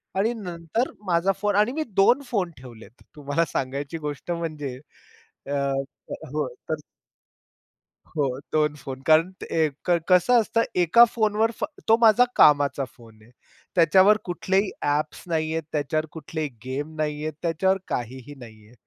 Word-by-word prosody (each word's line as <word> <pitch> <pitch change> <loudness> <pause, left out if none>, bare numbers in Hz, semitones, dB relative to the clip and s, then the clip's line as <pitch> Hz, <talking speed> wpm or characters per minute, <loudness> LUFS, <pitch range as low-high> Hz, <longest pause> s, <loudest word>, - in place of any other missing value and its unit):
आणि 220 +5 +1
नंतर 180 +3 -3
माझा 180 +2 +2
फोन 205 -1 +1
आणि 210 +4 +3
मी 315 +1 -1
2 240 +8 +5
फोन 185 -6 0
ठेवलेत. 120 -3 -14
तुम्हाला 145 +3 0
सांगायची 140 +4 -3
गोष्ट 145 +4 -5
म्हणजे. 150 -6 -4 0.7
अ, 140 - -3 0.8
हो. - - -1 0.2
तर. - - +1 1.3
हो, 135 -5 -2
2 150 -1 +2
फोन 135 -2 -8
कारण 160 +3 +5 0.2
ए 160 -1 +2 0.2
कसं 180 +7 +4
असतं, 230 +1 +1
1 180 +7 +7
फोनवर 220 0 +2 0.4
तो 225 - +7
माझा 230 +2 +6
कामाचा 145 -2 +5
फोन 110 -3 -17
आहे. 115 - -20 0.4
त्याच्यावर 190 +5 +6
कुठलेही 190 +3 0 0.2
ॲप्स 150 +1 -1
नाहीयेत, 160 0 -1
त्याच्यावर 155 +1 -1
कुठलेही 155 -1 -4 0.2
गेम 145 +4 -4
नाहीयेत, 155 0 -2
त्याच्यावर 190 +3 +1
काहीही 130 +3 -5
नाहीये. 110 -2 -14
160 Hz, 130 wpm, -24 LUFS, 145-190 Hz, 1.3 s, 1